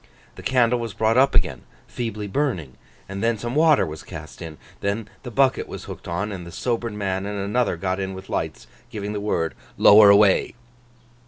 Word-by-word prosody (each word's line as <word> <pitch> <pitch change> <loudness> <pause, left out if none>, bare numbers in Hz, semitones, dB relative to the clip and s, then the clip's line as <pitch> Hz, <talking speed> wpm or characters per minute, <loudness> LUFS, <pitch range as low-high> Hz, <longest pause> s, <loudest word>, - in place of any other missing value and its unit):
The - - -11
candle 125 -2 +2
was 115 -4 -5
brought 110 +1 +2
up 135 +2 +4
again, - - +1 0.3
feebly 110 -3 -4
burning, 100 - -2 0.3
and 100 0 -6
then 115 0 +1
some 120 +3 -4
water 155 0 +4
was 80 0 -7
cast 80 +1 -10
in. 80 -2 -8 0.2
Then 100 +2 -2
the 125 - -7
bucket 130 +2 +2
was - - -8
hooked - - -9
on; 95 +5 -2
and 95 -3 -6
the 85 - -10
sobered 115 +3 -2
man 95 -1 -2
and 105 0 -4
another 100 0 0
got 95 +2 -2
in 95 0 -3
with 95 +1 -10
lights, - - -3 0.2
giving 105 -3 -5
the 105 - -3
word 85 -6 -1 0.2
'Lower 105 0 +8
away! 100 +1 +4
105 Hz, 190 wpm, -23 LUFS, 95-115 Hz, 0.3 s, Lower